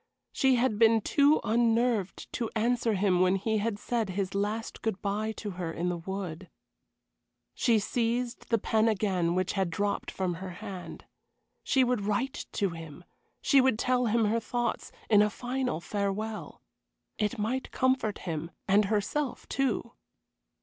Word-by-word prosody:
She 265 Hz, -1 st, +3 dB
had 235 Hz, -3 st, +1 dB
been 225 Hz, -1 st, +6 dB
too 285 Hz, +7 st, +4 dB
unnerved 230 Hz, -2 st, +1 dB
to 235 Hz, -3 st, -2 dB
answer 230 Hz, 0 st, +1 dB
him 190 Hz, -2 st, +2 dB
when 185 Hz, +1 st, +4 dB
he 215 Hz, +3 st, 0 dB
had 210 Hz, 0 st, -1 dB
said 225 Hz, -1 st, -1 dB
his 190 Hz, 0 st, -2 dB
last 210 Hz, +3 st, -2 dB
good 220 Hz, -4 st, -1 dB
bye 210 Hz, +2 st, -1 dB
to 210 Hz, -1 st, -6 dB
her 175 Hz, -3 st, -4 dB
in 175 Hz, +2 st, -2 dB
the 175 Hz, -, -2 dB
wood. 180 Hz, -1 st, -5 dB, 1.0 s
She 230 Hz, -2 st, +3 dB
seized 235 Hz, +3 st, -1 dB
the 230 Hz, -, +4 dB
pen 220 Hz, +1 st, +2 dB
again 185 Hz, -5 st, +1 dB
which 185 Hz, 0 st, 0 dB
had 190 Hz, -3 st, 0 dB
dropped 200 Hz, +4 st, -1 dB
from 185 Hz, -2 st, -2 dB
her 190 Hz, -, -5 dB
hand. 195 Hz, -4 st, -8 dB, 0.6 s
She 265 Hz, -2 st, +3 dB
would 250 Hz, -3 st, +1 dB
write 210 Hz, +7 st, -2 dB
to 200 Hz, -4 st, 0 dB
him. 165 Hz, 0 st, -9 dB, 0.4 s
She 275 Hz, -2 st, +6 dB
would 255 Hz, -4 st, +3 dB
tell 250 Hz, +1 st, +1 dB
him 225 Hz, 0 st, +2 dB
her 220 Hz, +2 st, +2 dB
thoughts 240 Hz, +1 st, -2 dB, 0.2 s
in 210 Hz, -2 st, +6 dB
a 210 Hz, -, +4 dB
final 250 Hz, -3 st, -2 dB
farewell. 205 Hz, +4 st, -3 dB, 0.6 s
It 210 Hz, +3 st, 0 dB
might 240 Hz, +5 st, -2 dB
comfort 260 Hz, -5 st, +1 dB
him, 165 Hz, -1 st, -3 dB, 0.2 s
and 200 Hz, +2 st, +4 dB
herself, 225 Hz, +7 st, -1 dB
too. 270 Hz, -5 st, -1 dB
215 Hz, 155 wpm, -29 LUFS, 195-235 Hz, 1.0 s, been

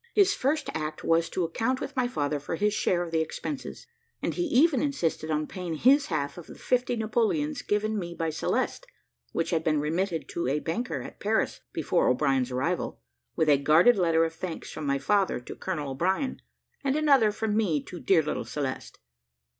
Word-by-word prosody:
His 405 Hz, -1 st, +5 dB
first 285 Hz, 0 st, 0 dB
act 155 Hz, -1 st, -4 dB
was, 165 Hz, 0 st, +2 dB
to 185 Hz, -, -1 dB
account 225 Hz, +10 st, -1 dB
with 275 Hz, -, -6 dB
my 255 Hz, -2 st, +2 dB
father 145 Hz, -10 st, -1 dB
for 145 Hz, -, -4 dB
his 210 Hz, +4 st, +1 dB
share 175 Hz, -3 st, +1 dB
of 170 Hz, -, -7 dB
the 160 Hz, -1 st, +2 dB
expenses; 270 Hz, -, -5 dB, 0.3 s
and -, -, -2 dB
he 350 Hz, -, -1 dB
even 290 Hz, -1 st, +4 dB
insisted 170 Hz, -, -1 dB
upon 155 Hz, 0 st, 0 dB
paying 180 Hz, -1 st, -5 dB
his 275 Hz, -, +4 dB
half 150 Hz, 0 st, -2 dB
of 170 Hz, -, -11 dB
the -, -, -11 dB
fifty 245 Hz, -1 st, 0 dB
Napoleons 240 Hz, +6 st, 0 dB
given 210 Hz, +1 st, 0 dB
me 170 Hz, -2 st, -5 dB
by 165 Hz, -1 st, -1 dB
Celeste, 155 Hz, -, -1 dB, 0.4 s
which 165 Hz, -, -1 dB
had 165 Hz, -2 st, +1 dB
been 155 Hz, -2 st, +2 dB
remitted 165 Hz, +3 st, -1 dB
to 170 Hz, -, -2 dB
a 140 Hz, +3 st, +1 dB
banker 170 Hz, +11 st, -3 dB
at -, -, -10 dB
Paris 220 Hz, +2 st, 0 dB
before -, -, +1 dB
O'Brien's 135 Hz, -3 st, +2 dB
arrival, 130 Hz, 0 st, -2 dB, 0.4 s
with 160 Hz, -, +1 dB
a 145 Hz, -2 st, +5 dB
guarded 160 Hz, +12 st, +6 dB
letter 165 Hz, -4 st, +3 dB
of 165 Hz, -, -4 dB
thanks 165 Hz, 0 st, -6 dB
from 150 Hz, -, -5 dB
my 140 Hz, 0 st, +2 dB
father 195 Hz, +4 st, +1 dB
to 125 Hz, -, -9 dB
Colonel 150 Hz, -7 st, -3 dB
O'Brien, 190 Hz, -, -1 dB, 0.4 s
and 275 Hz, 0 st, +1 dB
another 280 Hz, -8 st, +4 dB
from 210 Hz, 0 st, -2 dB
me 190 Hz, -9 st, +2 dB
to 180 Hz, -, -9 dB
dear 170 Hz, -3 st, +3 dB
little 150 Hz, -, -2 dB
Celeste. 140 Hz, -3 st, -4 dB
175 Hz, 195 wpm, -27 LUFS, 155-245 Hz, 0.4 s, guarded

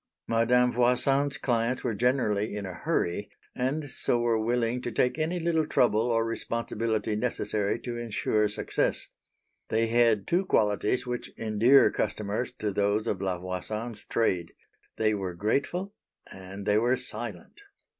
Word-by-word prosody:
Madame 125 Hz, +2 st, +3 dB
Voisin's 135 Hz, +3 st, +2 dB
clients 120 Hz, 0 st, 0 dB
were 120 Hz, -, 0 dB
generally 110 Hz, -3 st, +1 dB
in 105 Hz, -1 st, -4 dB
a 95 Hz, -, -6 dB
hurry, 85 Hz, +1 st, -1 dB, 0.3 s
and 145 Hz, +4 st, -1 dB
so 120 Hz, -, +1 dB
were 120 Hz, -1 st, +1 dB
willing 120 Hz, +1 st, 0 dB
to 120 Hz, -, -4 dB
take 125 Hz, +5 st, +1 dB
any 165 Hz, +3 st, 0 dB
little 160 Hz, -2 st, +1 dB
trouble 110 Hz, -6 st, +3 dB
or 115 Hz, -1 st, +1 dB
responsibility 115 Hz, -1 st, -2 dB
necessary 105 Hz, -3 st, -1 dB
to 120 Hz, -1 st, -5 dB
ensure 110 Hz, -2 st, 0 dB
success. 105 Hz, -, -1 dB, 0.6 s
They 115 Hz, +1 st, +2 dB
had 115 Hz, -3 st, +3 dB
two 185 Hz, +2 st, +1 dB
qualities 105 Hz, -, +1 dB
which 125 Hz, -1 st, -4 dB
endear 115 Hz, +5 st, +5 dB
customers 105 Hz, +4 st, -2 dB
to 105 Hz, -4 st, -3 dB
those 100 Hz, +2 st, +1 dB
of 95 Hz, -, -2 dB
La 95 Hz, -2 st, -1 dB
Voisin's 105 Hz, +5 st, -4 dB
trade; 90 Hz, -7 st, 0 dB, 0.4 s
they 110 Hz, -1 st, +2 dB
were 95 Hz, -4 st, -3 dB
grateful 140 Hz, -, -1 dB, 0.4 s
and 95 Hz, +1 st, -9 dB
they 105 Hz, 0 st, +3 dB
were 120 Hz, +3 st, +2 dB
silent. 415 Hz, -, -6 dB
115 Hz, 145 wpm, -28 LUFS, 105-125 Hz, 0.6 s, endear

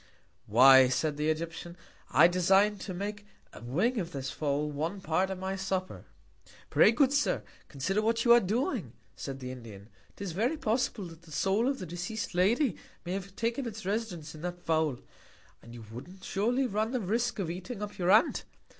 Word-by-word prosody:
Why, 130 Hz, +4 st, +8 dB
said 150 Hz, +3 st, 0 dB
the 150 Hz, +1 st, 0 dB
Egyptian, 165 Hz, +2 st, -4 dB, 0.3 s
I -, -, +7 dB
design 195 Hz, +4 st, +3 dB
to 195 Hz, -, -6 dB
make 205 Hz, +3 st, -5 dB, 0.3 s
a -, -, -11 dB
Wing 185 Hz, -, 0 dB
of 175 Hz, -2 st, -4 dB
this 135 Hz, -1 st, -4 dB
Fowl 150 Hz, +1 st, -1 dB
one 160 Hz, +7 st, -3 dB
Part 185 Hz, +2 st, 0 dB
of 190 Hz, -, -4 dB
my 190 Hz, +1 st, -3 dB
Supper. 190 Hz, -1 st, -3 dB, 0.7 s
Pray, -, -, +6 dB
good 265 Hz, +3 st, +3 dB
Sir, 290 Hz, 0 st, +1 dB, 0.2 s
consider 185 Hz, +9 st, -1 dB
what 230 Hz, +2 st, +1 dB
you 235 Hz, -, +8 dB
are 240 Hz, -, +8 dB
doing, 210 Hz, -, -1 dB, 0.2 s
said 135 Hz, -1 st, -6 dB
the 125 Hz, -1 st, -6 dB
Indian. 110 Hz, -5 st, -11 dB, 0.3 s
'Tis 200 Hz, -3 st, -5 dB
very 230 Hz, -, 0 dB
possible, 230 Hz, -4 st, -1 dB
that 165 Hz, -1 st, -11 dB
the 165 Hz, -2 st, -17 dB
Soul 195 Hz, -, +1 dB
of 275 Hz, 0 st, 0 dB
the 185 Hz, -, -6 dB
deceas'd 180 Hz, +5 st, -5 dB
Lady 220 Hz, -, +2 dB, 0.3 s
may 175 Hz, -, -3 dB
have 195 Hz, 0 st, -6 dB
taken 235 Hz, +4 st, -1 dB
its 220 Hz, -3 st, -7 dB
Residence 190 Hz, -7 st, -3 dB
in 155 Hz, -, -11 dB
that 175 Hz, 0 st, -5 dB
Fowl. 160 Hz, -5 st, +1 dB, 0.6 s
And 115 Hz, +1 st, -12 dB
you 115 Hz, -2 st, -10 dB
wouldn't 180 Hz, +11 st, -10 dB
surely 240 Hz, +7 st, 0 dB
run 220 Hz, +1 st, -1 dB
the 255 Hz, -, +1 dB
Risque 230 Hz, +3 st, -1 dB
of 170 Hz, -4 st, -2 dB
eating 195 Hz, +5 st, -6 dB
up 205 Hz, -1 st, -7 dB
your 175 Hz, 0 st, +1 dB
Aunt? 215 Hz, +4 st, +4 dB
185 Hz, 190 wpm, -30 LUFS, 160-220 Hz, 0.7 s, Why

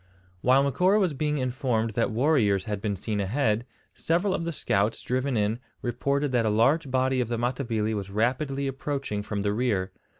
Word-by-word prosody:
While 130 Hz, +2 st, +4 dB
Macora 180 Hz, -, +3 dB
was 185 Hz, -6 st, +1 dB
being 150 Hz, +1 st, -1 dB
informed 125 Hz, -4 st, -1 dB
that 115 Hz, +2 st, 0 dB
warriors 110 Hz, -6 st, +2 dB
had 105 Hz, -2 st, -4 dB
been 105 Hz, -2 st, -1 dB
seen 105 Hz, +2 st, -3 dB
ahead, 110 Hz, +2 st, 0 dB, 0.3 s
several 175 Hz, +4 st, 0 dB
of 165 Hz, -, -2 dB
the 170 Hz, -, -1 dB
scouts 105 Hz, -7 st, 0 dB
driven 130 Hz, 0 st, -1 dB
in 105 Hz, +2 st, 0 dB, 0.2 s
reported 140 Hz, +3 st, 0 dB
that 120 Hz, -2 st, +2 dB
a 110 Hz, -, +1 dB
large 135 Hz, +8 st, +2 dB
body 130 Hz, 0 st, +1 dB
of 120 Hz, -, -1 dB
the 120 Hz, 0 st, -2 dB
Matabili 120 Hz, -3 st, -1 dB
was 100 Hz, -2 st, -4 dB
rapidly 135 Hz, +7 st, 0 dB
approaching 135 Hz, -5 st, -3 dB
from 105 Hz, -1 st, -3 dB
the 100 Hz, 0 st, +1 dB
rear. 105 Hz, -5 st, 0 dB
125 Hz, 180 wpm, -26 LUFS, 105-140 Hz, 0.3 s, While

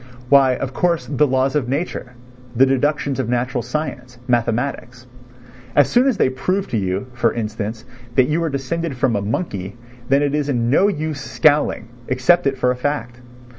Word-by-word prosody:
Why, 135 Hz, -2 st, +6 dB
of 130 Hz, +1 st, -4 dB
course, 170 Hz, -2 st, 0 dB
the 140 Hz, +3 st, +1 dB
laws 130 Hz, 0 st, +1 dB
of 130 Hz, -5 st, 0 dB
nature, 140 Hz, -3 st, -3 dB, 0.4 s
the 130 Hz, +3 st, +6 dB
deductions 140 Hz, +1 st, 0 dB
of 125 Hz, -3 st, -1 dB
natural 125 Hz, 0 st, -1 dB
science, 125 Hz, -1 st, -5 dB
mathematics. 120 Hz, +1 st, -1 dB, 0.7 s
As 145 Hz, -, +4 dB
soon 245 Hz, +2 st, +4 dB
as 255 Hz, -6 st, +1 dB
they -, -, +3 dB
prove 185 Hz, +10 st, -1 dB
to 115 Hz, -, -1 dB
you, 95 Hz, +2 st, -2 dB
for 120 Hz, -2 st, +1 dB
instance, 110 Hz, 0 st, -4 dB, 0.3 s
that 130 Hz, -1 st, +4 dB
you 155 Hz, +3 st, 0 dB
are 165 Hz, -, 0 dB
descended 140 Hz, +2 st, -3 dB
from 125 Hz, -2 st, +1 dB
a 100 Hz, -, 0 dB
monkey, 100 Hz, -, -3 dB, 0.3 s
then 140 Hz, +2 st, +4 dB
it 145 Hz, -1 st, 0 dB
is 150 Hz, -1 st, -1 dB
no 125 Hz, +8 st, +3 dB
use 155 Hz, -6 st, -3 dB
scowling, 145 Hz, -6 st, +1 dB, 0.2 s
accept 135 Hz, +6 st, +3 dB
it 135 Hz, -1 st, 0 dB
for 125 Hz, -1 st, +2 dB
a -, -, -1 dB
fact. 125 Hz, -2 st, -3 dB
130 Hz, 175 wpm, -20 LUFS, 120-145 Hz, 0.7 s, Why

